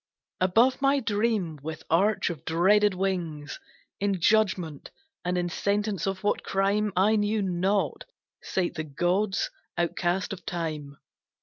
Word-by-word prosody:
Above 225 +9 +3
my 275 0 +4
dream, 210 - 0
with 155 +1 -6
arch 190 +3 +2
of 160 -6 -8
dreaded 195 +5 +3
wings, 170 -6 -3 0.4
In 200 -2 0
judgement 180 -6 +1 0.3
and 180 0 -1
in 175 0 0
sentence 200 +1 -1
of 195 +1 -3
what 205 - +1
crime 200 +2 +1
I 200 +4 +4
knew 210 0 +1
not, 190 +2 0 0.4
sate 180 -2 -1
the 155 -2 -3
gods 180 +7 0 0.3
outcast 175 +2 0
of 185 -3 -9
time. 155 -5 -4
190 Hz, 130 wpm, -27 LUFS, 170-205 Hz, 0.4 s, my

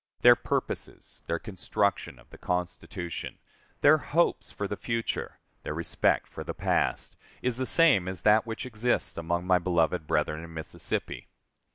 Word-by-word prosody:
Their - - +9
purposes, - - -4
their 85 - 0
construction 100 +1 -1
of - - -19
the - - -13
Constitution, 90 -1 -4 0.4
their 155 +2 +6
hopes 170 +4 +1
for 100 - -4
the 105 - -3
future, 115 +2 -3 0.2
their 75 - -5
respect 85 +1 +1
for - - -8
the - - -5
past, - - 0 0.3
is 125 -2 0
the 130 0 -1
same 145 - +5
as 95 -2 -5
that 110 +1 +5
which 115 +4 -4
exists 120 0 0
among 85 +2 -2
my 90 -1 +4
beloved 85 -2 +1
brethren 75 +1 0
in 85 - -10
Mississippi.... 80 - -4
95 Hz, 155 wpm, -28 LUFS, 85-115 Hz, 0.4 s, Their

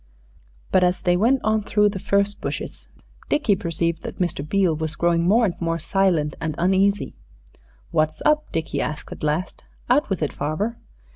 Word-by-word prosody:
But 185 - +4
as 180 0 +1
they 175 0 +3
went 240 +8 +3
on 215 0 +2
through 210 0 +2
the 200 -1 -5
furze 200 +2 +1
bushes - - -6 0.4
Dickie 240 -9 +2
perceived 170 -1 -2
that - - -7
Mr. 175 -5 -1
Beale 180 +1 +1
was 155 0 -3
growing 170 0 +2
more 225 +5 +4
and 185 - 0
more 165 0 0
silent 170 -3 +1
and 160 -2 -2
uneasy. 195 +3 +2 0.8
"What's 155 -1 +1
up?" 305 0 +2
Dickie 160 - -2
asked 150 0 -4
at - - -8
last. 155 +5 -2 0.3
"Out 280 0 +3
with 190 -5 -1
it, 150 - -1
farver." 155 +11 -2
180 Hz, 170 wpm, -23 LUFS, 160-205 Hz, 0.8 s, But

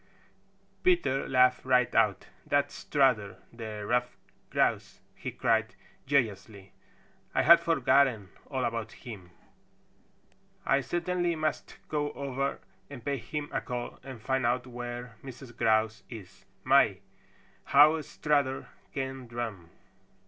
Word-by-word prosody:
Peter 345 - +2
laughed 125 -1 +4
right 125 -2 +3
out. 105 -5 +2 0.2
"That's 145 0 +1
Strutter 125 -9 +1 0.2
the 110 -3 -6
Stuffed 125 +2 0 0.3
Grouse!" - - 0
he - - -6
cried - - 0 0.3
joyously. 105 -7 -1 0.6
"I - - +3
had 170 +1 +8
forgotten 135 - +2 0.2
all 130 -2 -2
about 115 -1 -3
him. 100 -7 -10 1.4
I 135 +1 +3
certainly 175 +2 -1
must 155 0 -3
go 145 -1 -1
over 140 0 -2 0.3
and 130 -5 -10
pay 140 -1 0
him 145 +5 -5
a - - -1
call 120 -1 -5
and 130 -3 -9
find 130 +3 -1
out 125 +1 +1
where 120 -1 -7
Mrs. 130 -2 -10
Grouse 110 -2 +2
is. 100 -4 -11 0.2
My, 130 -7 +4 0.7
how 155 +3 +6
Strutter 145 -3 -1 0.2
can 135 -2 -4
drum!" 115 -8 -5
125 Hz, 120 wpm, -29 LUFS, 115-140 Hz, 1.4 s, had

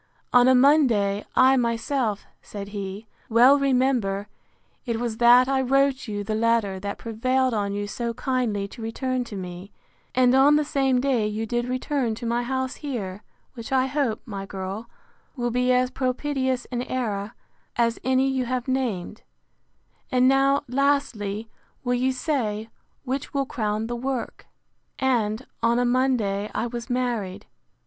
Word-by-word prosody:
On 245 0 +6
a 260 - +6
Monday, 245 -8 +4
I 265 +1 +6
myself, 230 -2 -1 0.2
said 200 -1 -8
he, 200 +1 -6 0.2
well 250 +5 +6
remember, 250 -7 +1 0.6
it 235 -4 -2
was 235 -2 -3
that 245 +2 +6
I 270 0 +1
wrote 270 0 +2
you 205 -1 -3
the 215 +2 -3
letter, 220 -3 +1
that 200 +1 -4
prevailed 255 +3 0
on 200 -2 -1
you 205 0 -2
so 235 +3 -4
kindly 245 -6 -1
to 230 - -11
return 255 +3 -2
to 220 - -8
me; 180 +1 -7 0.4
and 250 0 +4
on 275 +3 +6
the 300 0 +2
same 270 -3 +1
day 250 -5 +1
you 215 +1 -3
did 240 +2 -1
return 255 -2 -1
to 235 - -7
my 235 +1 0
house 260 +2 -2
here; 210 -9 -5 0.3
which 235 +1 -9
I 260 -1 +3
hope, 265 -5 -1
my 200 -5 -6
girl, 195 +4 -6 0.5
will 240 -2 -1
be 250 +1 +2
as 250 0 +2
propitious 260 0 -1
an 245 -1 -1
era 220 -5 -3 0.4
as 230 -1 +1
any 260 +2 +2
you 260 -1 0
have 250 0 -2
named: 230 -7 -2 0.9
And 255 -1 +4
now, 275 +1 +3
lastly, 250 -6 0 0.4
will 245 -1 0
you 255 +2 +1
say, 235 -6 -2 0.3
which 270 +1 -4
will 275 -1 +1
crown 215 -3 -2
the 240 +1 -3
work; 255 0 -4 0.5
And, 240 -2 0 0.2
on 230 +1 +3
a 245 - +2
Monday 240 -5 +1
I - - 0
was 240 +1 -6
married. 240 -7 -2
245 Hz, 155 wpm, -24 LUFS, 215-260 Hz, 0.9 s, On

